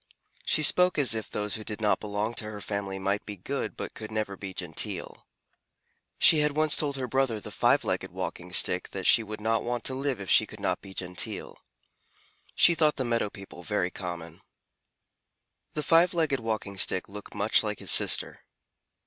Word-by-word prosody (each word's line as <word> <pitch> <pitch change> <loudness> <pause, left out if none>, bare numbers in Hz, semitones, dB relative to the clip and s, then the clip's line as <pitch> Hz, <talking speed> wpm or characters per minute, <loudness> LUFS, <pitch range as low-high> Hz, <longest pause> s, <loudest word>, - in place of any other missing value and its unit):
She 155 - +2
spoke 180 +4 +4
as 135 -6 +3
if 110 -1 -4
those 105 -1 -2
who 110 - -3
did 105 -1 -5
not 105 -1 +1
belong 105 +2 -3
to 110 - -4
her 105 -1 -7
family 100 -2 -4
might 100 +2 -1
be 105 - -7
good 135 +10 -5
but - - -6
could 110 0 -8
never 110 -2 -3
be 95 0 -7
genteel. 90 -4 -2 0.9
She 155 - +5
had 150 -1 +2
once 155 -1 +3
told 140 -2 0
her 130 -1 -3
brother, 130 -3 0
the - - -10
Five - - +2
Legged - - -2
Walking 90 +1 -6
Stick, 90 0 +4
that 95 -1 -5
she 120 - +5
would 110 0 -7
not 110 +1 0
want 120 -1 -3
to 130 - 0
live 135 -3 -2
if 95 - -7
she - - +4
could - - -12
not - - -1
be 95 -1 -12
genteel. 90 -1 -3 1.0
She 170 - +6
thought 155 -2 +2
the 130 - -3
meadow 115 -3 0
people 100 -3 -12
very 90 0 -1
common. 85 -3 -7 1.3
The 150 - -3
Five 170 +4 +4
Legged 155 -5 +1
Walking 110 -3 -4
Stick 95 0 +1
looked 105 +1 -10
much 105 +2 +3
like 105 -2 -3
his - - 0
sister. - - +4
110 Hz, 190 wpm, -27 LUFS, 100-135 Hz, 1.3 s, She